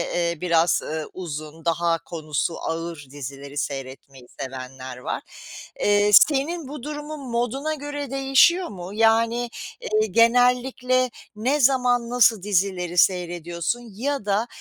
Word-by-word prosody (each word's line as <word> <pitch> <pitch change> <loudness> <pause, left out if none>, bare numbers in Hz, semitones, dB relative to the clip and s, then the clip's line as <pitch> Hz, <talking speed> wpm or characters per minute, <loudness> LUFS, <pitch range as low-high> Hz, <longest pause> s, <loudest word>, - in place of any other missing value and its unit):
eee, 170 -1 0
biraz, 170 -1 +3
ııı, 155 -1 -4
uzun, 155 -2 -7
daha 170 0 +1
konusu 155 0 -3
ağır 165 -2 -4
dizileri 140 0 -8
seyretmeyi 135 -2 -6
sevenler 130 -1 -7
var. 125 - -4 0.6
Eee, 205 0 +3
senin 300 - +4
bu 285 -2 -8
durumun 295 -2 -6
moduna 245 +6 -1
göre 290 -2 -6
değişiyor 275 +7 +4
mu, 180 -1 -8
yani, 230 +2 +2 0.3
eee, 435 -2 +1
genellikle 250 +2 +3 0.3
ne 255 +8 0
zaman 245 -3 +3
nasıl 230 -5 +4
dizileri 185 -3 0
seyrediyorsun 175 +3 +1
ya 275 +1 -2
da 210 +3 +1
205 Hz, 120 wpm, -23 LUFS, 165-255 Hz, 0.6 s, senin